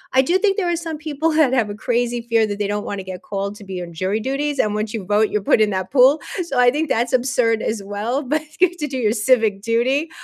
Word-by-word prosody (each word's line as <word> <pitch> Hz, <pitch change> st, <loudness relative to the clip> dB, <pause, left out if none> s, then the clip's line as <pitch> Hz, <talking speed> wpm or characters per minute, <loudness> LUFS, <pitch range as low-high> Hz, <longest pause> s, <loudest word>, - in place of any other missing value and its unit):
I 265 Hz, -, +7 dB
do 350 Hz, +8 st, +2 dB
think 395 Hz, -1 st, +1 dB
there 365 Hz, -4 st, 0 dB
are 345 Hz, -, +1 dB
some 330 Hz, -2 st, -5 dB
people 310 Hz, +1 st, -1 dB
that 305 Hz, -5 st, +3 dB
have 235 Hz, -5 st, +1 dB
a -, -, -6 dB
crazy 240 Hz, +2 st, -1 dB
fear 230 Hz, -1 st, +2 dB
that 205 Hz, -, -4 dB
they 205 Hz, -, 0 dB
don't 205 Hz, 0 st, -3 dB
wanna 200 Hz, -1 st, -4 dB
get 185 Hz, -1 st, -8 dB
called 200 Hz, 0 st, -4 dB
to 210 Hz, -, -12 dB
be 190 Hz, -2 st, -6 dB
on 170 Hz, -1 st, -10 dB
jury 185 Hz, +6 st, -1 dB
duties, 275 Hz, +5 st, -2 dB
and 210 Hz, -4 st, +1 dB
once 215 Hz, +1 st, -3 dB
you 205 Hz, -4 st, -5 dB
vote, 210 Hz, +2 st, +2 dB
you're 210 Hz, -1 st, -2 dB
put 220 Hz, -, +3 dB
in 215 Hz, -, +3 dB
that 185 Hz, -1 st, -3 dB
pool. 270 Hz, +3 st, +5 dB, 0.2 s
So, 275 Hz, -7 st, -2 dB
I 245 Hz, 0 st, +6 dB
think 300 Hz, +2 st, -2 dB
that's 240 Hz, +3 st, 0 dB
absurd 245 Hz, -3 st, +1 dB
as 215 Hz, -2 st, -3 dB
well, 215 Hz, +8 st, -3 dB
but 300 Hz, +4 st, -1 dB, 0.2 s
you 370 Hz, -, +5 dB
have 355 Hz, -, -16 dB
to 300 Hz, -3 st, -3 dB
do 265 Hz, -1 st, -4 dB
your 215 Hz, -4 st, +1 dB
civic 220 Hz, -3 st, +2 dB
duty. 255 Hz, +8 st, 0 dB
235 Hz, 275 wpm, -20 LUFS, 210-280 Hz, 0.2 s, I